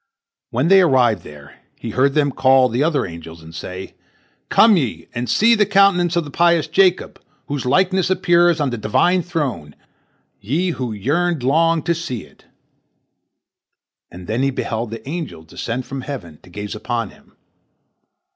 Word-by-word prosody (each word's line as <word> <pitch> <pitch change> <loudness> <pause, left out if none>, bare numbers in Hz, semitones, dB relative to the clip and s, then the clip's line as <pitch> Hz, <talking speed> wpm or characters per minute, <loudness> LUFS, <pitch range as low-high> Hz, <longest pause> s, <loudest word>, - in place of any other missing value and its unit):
When 130 +7 0
they 195 0 +7
arrived 125 - +3
there, 75 -2 -14 0.2
he 115 - -6
heard 135 +5 +1
them 145 -2 +2
call 130 0 +4
the 125 +4 0
other 150 -5 0
angels, 85 -1 -10
and 80 +1 -13
say, 90 +3 -8 0.6
"Come 220 -2 +5
ye 110 - -2
and 120 -1 -4
see 215 - +4
the 215 -2 +4
countenance 195 -4 +3
of 170 - +1
the 145 - -9
pious 170 0 +2
Jacob, 185 +2 +1 0.2
whose 140 -3 -4
likeness 185 +6 +2
appears 175 -2 +3
on 145 -3 0
the 120 - -4
Divine 175 - +2
throne, 135 - -4 0.6
ye 160 - -1
who 125 -7 -4
yearned 150 - -1
long 165 +4 +2
to 170 - +1
see 160 - -5
it," - - -21 1.6
and 90 +1 -11
then 110 +7 -2
he 135 - +2
beheld 115 -3 -3
the 115 +3 -9
angels 155 - -6
descend 120 +9 -5
from 135 -1 -6
heaven 120 - -8
to - - -18
gaze 105 +3 -6
upon 115 +2 -3
him. - - -23
135 Hz, 165 wpm, -19 LUFS, 110-170 Hz, 1.6 s, they